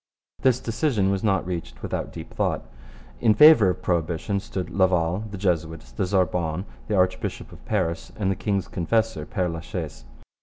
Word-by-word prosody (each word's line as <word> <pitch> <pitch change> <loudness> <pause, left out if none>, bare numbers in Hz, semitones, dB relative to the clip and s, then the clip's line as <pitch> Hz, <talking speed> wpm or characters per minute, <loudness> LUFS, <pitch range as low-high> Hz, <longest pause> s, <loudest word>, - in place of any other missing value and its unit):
This 125 -2 +3
decision 115 -5 0
was 100 -1 -1
not 100 -4 +2
reached 85 -2 -5
without - - -3
deep - - -9
thought. - - -1 0.5
In 110 -3 +4
favour 150 -10 +8
of 90 - -3
prohibition 85 +3 0
stood 95 -3 -5
Laval, 90 +1 +2
the 100 - -6
Jesuits, 80 -8 -2
the 65 +10 -2
Sorbonne, 90 -2 0 0.2
the 110 - 0
Archbishop 90 -1 0
of - - -14
Paris, 85 0 -1
and 95 -3 0
the - - 0
king's 100 -1 -1
confessor, 110 -2 0
Pere 90 -4 -1
La 85 0 -4
Chaise. 80 -6 -6
95 Hz, 165 wpm, -25 LUFS, 85-105 Hz, 0.5 s, favour